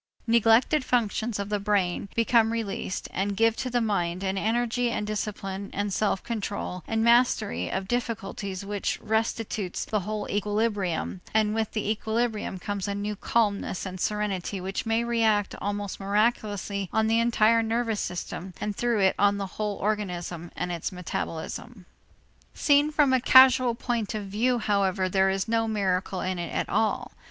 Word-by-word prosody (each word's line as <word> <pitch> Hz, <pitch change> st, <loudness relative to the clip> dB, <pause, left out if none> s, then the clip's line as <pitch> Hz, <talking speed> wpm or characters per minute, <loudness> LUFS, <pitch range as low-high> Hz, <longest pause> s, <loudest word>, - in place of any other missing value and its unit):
Neglected 235 Hz, +5 st, +4 dB
functions 230 Hz, -2 st, 0 dB
of 200 Hz, 0 st, -4 dB
the 210 Hz, -1 st, 0 dB
brain 200 Hz, -2 st, 0 dB
become 230 Hz, -1 st, +3 dB
released 215 Hz, -4 st, -3 dB
and 200 Hz, +1 st, -1 dB
give 225 Hz, 0 st, +4 dB
to 255 Hz, -, -2 dB
the 245 Hz, 0 st, +1 dB
mind 185 Hz, -4 st, -1 dB
an 190 Hz, 0 st, -1 dB
energy 240 Hz, +4 st, 0 dB
and 210 Hz, -, -2 dB
discipline 200 Hz, -2 st, -4 dB
and 205 Hz, 0 st, -2 dB
self 200 Hz, -2 st, 0 dB
control 200 Hz, -5 st, -4 dB
and 225 Hz, 0 st, 0 dB
mastery 235 Hz, -, +3 dB
of 190 Hz, 0 st, -3 dB
difficulties 200 Hz, -4 st, -3 dB
which 205 Hz, 0 st, -2 dB
restitutes 220 Hz, -3 st, -2 dB
the 215 Hz, -, 0 dB
whole 210 Hz, +2 st, -4 dB
equilibrium, 205 Hz, -4 st, -1 dB
and 215 Hz, -1 st, +3 dB
with 220 Hz, -1 st, -1 dB
the 215 Hz, -2 st, -2 dB
equilibrium 220 Hz, -1 st, -1 dB
comes 200 Hz, +2 st, -3 dB
a 200 Hz, -, -2 dB
new 205 Hz, +1 st, -3 dB
calmness 205 Hz, -3 st, 0 dB
and 185 Hz, -1 st, -6 dB
serenity 205 Hz, -2 st, -1 dB
which 190 Hz, +4 st, -4 dB
may 225 Hz, +1 st, +2 dB
react 225 Hz, -3 st, +1 dB
almost 205 Hz, 0 st, -3 dB
miraculously 205 Hz, -1 st, 0 dB
on 220 Hz, 0 st, +2 dB
the 225 Hz, +1 st, +3 dB
entire 230 Hz, -1 st, +4 dB
nervous 225 Hz, -1 st, -1 dB
system 180 Hz, +1 st, -5 dB
and 210 Hz, -1 st, -3 dB
through 235 Hz, -2 st, +1 dB
it 190 Hz, -1 st, +4 dB
on 205 Hz, 0 st, +4 dB
the 200 Hz, -, -2 dB
whole 205 Hz, +2 st, -3 dB
organism 180 Hz, -5 st, -3 dB
and 180 Hz, -, -3 dB
its 170 Hz, -2 st, -3 dB
metabolism. 180 Hz, +3 st, -5 dB, 0.7 s
Seen 290 Hz, 0 st, +4 dB
from 295 Hz, -3 st, +3 dB
a 260 Hz, -, +3 dB
causal 260 Hz, -2 st, +7 dB
point 230 Hz, -3 st, -2 dB
of 210 Hz, -2 st, -3 dB
view, 230 Hz, +6 st, +1 dB
however, 200 Hz, -3 st, +1 dB
there 190 Hz, +1 st, +3 dB
is 190 Hz, +2 st, -1 dB
no 225 Hz, 0 st, +1 dB
miracle 190 Hz, -3 st, -1 dB
in 185 Hz, -1 st, -2 dB
it 170 Hz, -, -4 dB
at -, -, -1 dB
all. 220 Hz, -, 0 dB
210 Hz, 165 wpm, -27 LUFS, 195-230 Hz, 0.7 s, causal